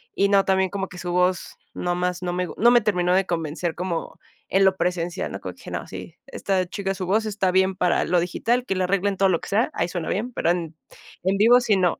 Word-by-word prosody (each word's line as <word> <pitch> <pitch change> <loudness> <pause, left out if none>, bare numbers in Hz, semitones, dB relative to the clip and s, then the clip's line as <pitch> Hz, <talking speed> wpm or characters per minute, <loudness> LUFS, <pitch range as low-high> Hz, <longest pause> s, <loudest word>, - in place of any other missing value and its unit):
y 200 0 +2
no, 200 -1 +4
también 190 -1 +2
como 195 0 -3
que 180 - -12
su 175 -1 -4
voz 180 0 0 0.2
nomás, 180 0 -2
no 175 - -1
me 180 0 -1
gu - - -8
no 235 +3 +5
me 240 - +6
terminó 180 -4 +1
de 190 0 +2
convencer 165 0 -2
como, 175 -2 -4 0.3
en 195 +1 +3
lo 190 0 +3
presencial, 175 0 -2
¿no? - - -6
Como - - -7
que - - -11
no, - - -4
sí, - - -9
esta 190 -2 -1
chica, 195 0 -3
su 185 -2 -5
voz 215 +3 +1
está 200 -3 0
bien 190 0 +2
para 180 -1 +1
lo 180 0 +2
digital, 240 +8 -1
que 195 - -1
le 185 - 0
arreglen 195 +1 0
todo 195 -1 +3
lo 170 - +1
que - - -8
sea, 225 +9 +1
ahí - - -1
suena 175 -3 -4
bien, 235 +6 -2
pero 170 - +1
en 165 -3 -3 0.5
en 190 +1 +1
vivo 235 +4 +6
sí, 215 -4 +2
no. 180 -3 +1
185 Hz, 250 wpm, -23 LUFS, 180-200 Hz, 0.5 s, me